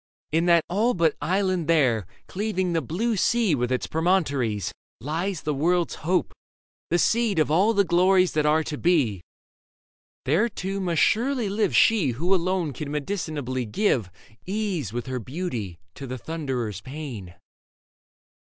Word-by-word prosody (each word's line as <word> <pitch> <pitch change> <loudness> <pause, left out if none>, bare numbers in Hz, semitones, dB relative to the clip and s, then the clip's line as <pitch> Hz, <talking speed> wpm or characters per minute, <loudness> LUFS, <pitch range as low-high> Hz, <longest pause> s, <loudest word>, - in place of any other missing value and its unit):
In 165 +3 +2
that 170 -2 +4
all 220 +7 +1
but 165 -3 +2
island 185 -2 0
there, 125 - +2 0.2
Cleaving 185 -3 -2
the 165 - +1
blue 210 - -1
sea 225 -1 +2
with 125 -2 0
its 130 - 0
promontories, 145 - 0 0.3
Lies 165 - -3
the 150 - -1
world's 170 +5 +1
hope, 180 +3 0 0.6
the 175 - +2
seed 225 +1 +2
of 155 -1 +2
all 190 +8 +4
the 200 - +4
glories 185 +1 +3
That 150 -1 +1
are 155 +1 +3
to 150 -1 -5
be; 140 - +2 1.0
there, 170 - +2
too, 195 -2 -4
must 170 -7 +1
surely 240 -1 +1
live 210 +2 0
She 215 -9 +4
who 170 +10 0
alone 180 -4 0
can 145 +3 -6
medicinably 145 - -3
give 120 - +1 0.4
Ease 190 - -2
with 120 +1 -4
her 130 -1 -3
beauty 120 - -5 0.2
to 135 - -8
the 130 +1 -5
Thunderer's 125 - -4
pain. 130 - -8
165 Hz, 150 wpm, -25 LUFS, 135-190 Hz, 1.0 s, that